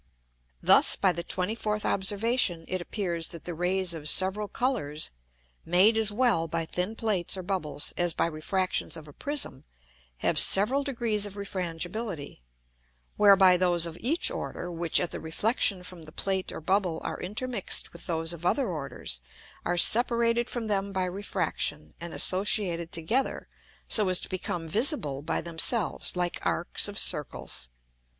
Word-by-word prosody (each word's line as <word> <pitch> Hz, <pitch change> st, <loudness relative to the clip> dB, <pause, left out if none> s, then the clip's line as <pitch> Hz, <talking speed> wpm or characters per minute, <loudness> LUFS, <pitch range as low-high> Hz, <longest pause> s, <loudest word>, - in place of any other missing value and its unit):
Thus, -, -, +6 dB
by 190 Hz, -, +2 dB
the 170 Hz, 0 st, -5 dB
24th 210 Hz, +4 st, -2 dB
Observation 200 Hz, -3 st, 0 dB
it 185 Hz, -1 st, -3 dB
appears, 175 Hz, -3 st, -3 dB
that 170 Hz, -, -8 dB
the 175 Hz, -, -4 dB
Rays 180 Hz, +1 st, -1 dB
of 150 Hz, -2 st, -1 dB
several 190 Hz, +3 st, +1 dB
Colours, 200 Hz, -, -2 dB, 0.5 s
made 185 Hz, +6 st, +4 dB
as 220 Hz, -1 st, +4 dB
well 210 Hz, -7 st, +1 dB
by 165 Hz, +1 st, -3 dB
thin 180 Hz, +6 st, -3 dB
Plates 200 Hz, -6 st, 0 dB
or 185 Hz, -, -6 dB
Bubbles, 175 Hz, -6 st, -2 dB
as 175 Hz, -1 st, +1 dB
by -, -, 0 dB
Refractions 170 Hz, +3 st, -2 dB
of 155 Hz, -1 st, -11 dB
a 145 Hz, -, -13 dB
Prism, 285 Hz, -, -3 dB, 0.6 s
have -, -, +2 dB
several 245 Hz, +9 st, +5 dB
degrees 230 Hz, -6 st, -1 dB
of 200 Hz, -, -11 dB
Refrangibility; 180 Hz, -, -5 dB, 0.7 s
whereby 195 Hz, -3 st, +6 dB
those 175 Hz, -2 st, +1 dB
of 165 Hz, -1 st, -6 dB
each 320 Hz, -, +4 dB
order, 180 Hz, -, -5 dB
which 170 Hz, -1 st, +2 dB
at 175 Hz, -, -2 dB
the -, -, -4 dB
reflexion 195 Hz, +3 st, 0 dB
from 180 Hz, -1 st, -11 dB
the 155 Hz, -1 st, -6 dB
Plate 190 Hz, +2 st, -2 dB
or -, -, -8 dB
Bubble 185 Hz, -1 st, 0 dB
are -, -, -5 dB
intermix'd 215 Hz, +3 st, -1 dB
with 170 Hz, -, -12 dB
those 165 Hz, 0 st, -1 dB
of 170 Hz, 0 st, -10 dB
other 255 Hz, +8 st, +1 dB
orders, 140 Hz, -, -5 dB, 0.4 s
are 175 Hz, -, -1 dB
separated 235 Hz, +3 st, +4 dB
from 240 Hz, -2 st, -4 dB
them 200 Hz, -2 st, -1 dB
by 190 Hz, -1 st, -1 dB
Refraction, 180 Hz, -5 st, -2 dB
and 170 Hz, 0 st, -6 dB
associated 185 Hz, -3 st, +2 dB
together 225 Hz, +12 st, -1 dB, 0.4 s
so 210 Hz, -4 st, +1 dB
as 185 Hz, -, +4 dB
to -, -, -8 dB
become 175 Hz, -2 st, -4 dB
visible 190 Hz, -, +1 dB
by 155 Hz, -, -1 dB
themselves 170 Hz, +6 st, +1 dB
like 175 Hz, -1 st, -2 dB
Arcs 175 Hz, -, +1 dB
of 205 Hz, 0 st, -7 dB
Circles. 150 Hz, -, +1 dB
185 Hz, 155 wpm, -27 LUFS, 165-210 Hz, 0.7 s, Thus